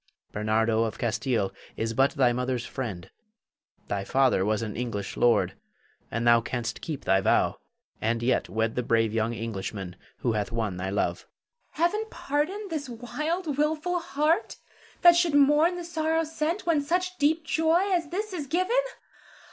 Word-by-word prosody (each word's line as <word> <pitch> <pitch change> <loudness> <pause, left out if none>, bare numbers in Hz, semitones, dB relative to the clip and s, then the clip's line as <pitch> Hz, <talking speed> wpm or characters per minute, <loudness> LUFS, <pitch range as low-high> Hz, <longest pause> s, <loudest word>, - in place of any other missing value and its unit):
Bernardo 110 +1 +1
of 110 - -3
Castile 115 -3 0 0.3
is 115 0 -1
but 135 +4 +4
thy 130 -5 +3
mother's 125 0 -2
friend; 105 -10 -5 0.8
thy 100 -1 -2
father 130 -3 +2
was 110 +2 0
an 110 -2 -5
English 110 -5 -4
lord, 120 -1 +3 0.6
and 115 +1 -2
thou 120 0 +6
canst 120 0 -4
keep 155 -4 -5
thy 95 0 +3
vow, - - +2 0.4
and 115 +1 0
yet 125 +2 +1
wed 110 +1 0
the 125 - -1
brave 115 -2 +1
young 115 +1 0
Englishman 100 -4 -5 0.3
who 120 - +1
hath 105 -1 -2
won 110 -5 -2
thy 95 +1 -3
love. 100 - 0
Zara. - - -20 0.6
Heaven 425 +4 -3
pardon 345 +9 -2
this 290 -4 -3
wild, 295 +6 -3
wilful 315 +4 +1
heart 310 +1 0 0.5
that 345 -1 +9
should 345 -3 +2
mourn 295 +5 +5
the 350 - -5
sorrow 325 -1 0
sent, 320 +4 -2
when 325 -4 +2
such 360 +5 -1
deep 315 +2 +2
joy 325 +3 +2
as 340 -3 +1
this 410 +4 -3
is 300 -6 -4
given. 365 - 0
135 Hz, 165 wpm, -27 LUFS, -, 0.8 s, that